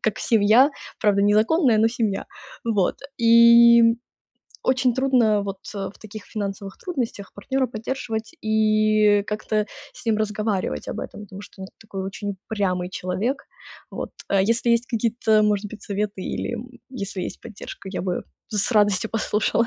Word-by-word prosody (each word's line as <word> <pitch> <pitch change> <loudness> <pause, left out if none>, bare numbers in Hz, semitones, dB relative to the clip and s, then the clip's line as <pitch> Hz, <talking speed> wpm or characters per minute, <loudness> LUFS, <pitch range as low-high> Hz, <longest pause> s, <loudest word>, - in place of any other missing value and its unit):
как 220 -1 0
семья", 225 +5 +4 0.3
правда 200 -1 +3
незаконная, 220 - +3
но 225 - +4
семья. 225 -4 -2 0.4
Вот, 210 -5 +1 0.2
и 235 0 +7 0.7
очень 260 -1 +2
трудно 245 -6 +3
вот 200 -1 -4 0.2
в 195 -1 -4
таких 215 -1 -9
финансовых 200 -2 -5
трудностях 240 - -4
партнера 265 +6 -1
поддерживать 225 -1 -5
и 215 -1 +3
как-то 215 0 -1 0.3
с - - -13
ним 220 -2 +2
разговаривать 210 - -2
об - - -4
этом, - - -8
потому 195 -1 -10
что 205 -1 -12
он 190 - -7
такой 200 -3 -6
очень 200 +1 -5
упрямый 185 -4 -1
человек. 190 +9 -2 0.5
Вот. - - -5 0.2
А, 195 -1 +3
если 230 +4 +1
есть 235 0 +3
какие-то, 225 -2 +1
может 210 -1 +1
быть, 220 - -10
советы 205 -1 -3
или, 240 - -3
м, 240 +2 -8 0.2
если 200 -6 -5
есть - - -6
поддержка, 205 -3 -9
я 185 - -3
бы 180 -1 -2 0.2
с 210 +1 +1
радостью 205 0 +3
послушала. 220 +1 +1
215 Hz, 150 wpm, -23 LUFS, 200-230 Hz, 0.7 s, и